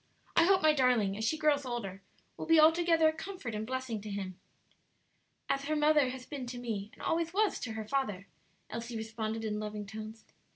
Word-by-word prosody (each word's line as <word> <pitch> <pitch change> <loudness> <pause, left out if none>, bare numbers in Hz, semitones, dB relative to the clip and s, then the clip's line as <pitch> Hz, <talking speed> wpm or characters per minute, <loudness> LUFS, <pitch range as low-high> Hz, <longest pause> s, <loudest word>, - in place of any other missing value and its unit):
I 335 - +6
hope 380 -1 +4
my 310 0 +6
darling, 245 -8 +3
as 220 - -4
she 315 +8 +1
grows 300 -2 +2
older, 220 -7 -4 0.3
will - - -6
be 325 0 +6
altogether 325 +1 +5
a 315 - +2
comfort 320 - -6
and 215 +1 -3
blessing 260 -4 -3
to 210 - -7
him." 190 -2 -5 1.1
"As 275 0 0
her 310 +1 0
mother 300 -3 +4
has 255 0 -7
been 270 -4 -6
to 245 0 -6
me, 220 -4 -4
and - - -13
always 335 +1 0
was 425 -1 +2
to 225 - -4
her 220 -1 -5
father," 210 -8 -1 0.5
Elsie 230 0 -4
responded 220 0 -3
in 210 -1 -2
loving 210 -1 -5
tones. 215 +2 -8
245 Hz, 200 wpm, -32 LUFS, 215-310 Hz, 1.1 s, I